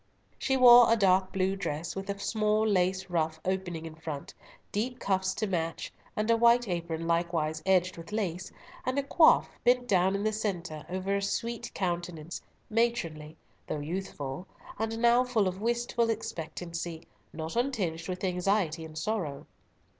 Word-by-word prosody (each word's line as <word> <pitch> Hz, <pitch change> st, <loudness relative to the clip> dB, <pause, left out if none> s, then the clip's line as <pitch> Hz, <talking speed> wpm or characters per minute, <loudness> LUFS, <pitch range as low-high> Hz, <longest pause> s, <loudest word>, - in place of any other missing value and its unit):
She 265 Hz, -1 st, +1 dB
wore 245 Hz, -2 st, +9 dB
a -, -, +6 dB
dark 190 Hz, -3 st, +3 dB
blue 190 Hz, 0 st, 0 dB
dress, 165 Hz, -4 st, -4 dB
with 195 Hz, +1 st, -5 dB
a 200 Hz, -, -2 dB
small 215 Hz, +1 st, +1 dB
lace 190 Hz, -1 st, +1 dB
ruff 160 Hz, -2 st, 0 dB
opening 180 Hz, -3 st, -2 dB
in 160 Hz, -, -7 dB
front, 155 Hz, -3 st, -7 dB, 0.4 s
deep 245 Hz, +5 st, -2 dB
cuffs 190 Hz, -3 st, 0 dB
to 215 Hz, -, -1 dB
match, 165 Hz, -4 st, -3 dB, 0.2 s
and 215 Hz, 0 st, -1 dB
a -, -, +6 dB
white 235 Hz, +1 st, +4 dB
apron 170 Hz, -2 st, -3 dB
likewise 165 Hz, -2 st, 0 dB
edged 185 Hz, -1 st, +3 dB
with 165 Hz, +4 st, -10 dB
lace, 190 Hz, -5 st, -2 dB, 0.3 s
and 255 Hz, +2 st, -1 dB
a 280 Hz, -, +2 dB
coif, 315 Hz, +3 st, +5 dB, 0.2 s
bent 245 Hz, 0 st, +3 dB
down 190 Hz, -1 st, +3 dB
in 200 Hz, -, -2 dB
the 215 Hz, 0 st, +1 dB
centre, 175 Hz, -8 st, -3 dB
over 190 Hz, +2 st, -1 dB
a 200 Hz, -, 0 dB
sweet 230 Hz, +3 st, -3 dB
countenance, 175 Hz, -3 st, -3 dB, 0.3 s
matronly, 175 Hz, -10 st, -1 dB, 0.3 s
though -, -, -2 dB
youthful, 155 Hz, -1 st, -5 dB, 0.3 s
and 225 Hz, 0 st, -1 dB
now 240 Hz, +2 st, +5 dB
full 235 Hz, -6 st, +1 dB
of 185 Hz, +2 st, -4 dB
wistful 235 Hz, 0 st, 0 dB
expectancy; 170 Hz, -5 st, -4 dB, 0.3 s
not 160 Hz, 0 st, -6 dB
untinged 195 Hz, -10 st, -1 dB
with 185 Hz, +1 st, -4 dB
anxiety 180 Hz, -3 st, 0 dB
and 155 Hz, -1 st, -9 dB
sorrow. 170 Hz, -7 st, -2 dB
190 Hz, 160 wpm, -29 LUFS, 165-220 Hz, 0.4 s, wore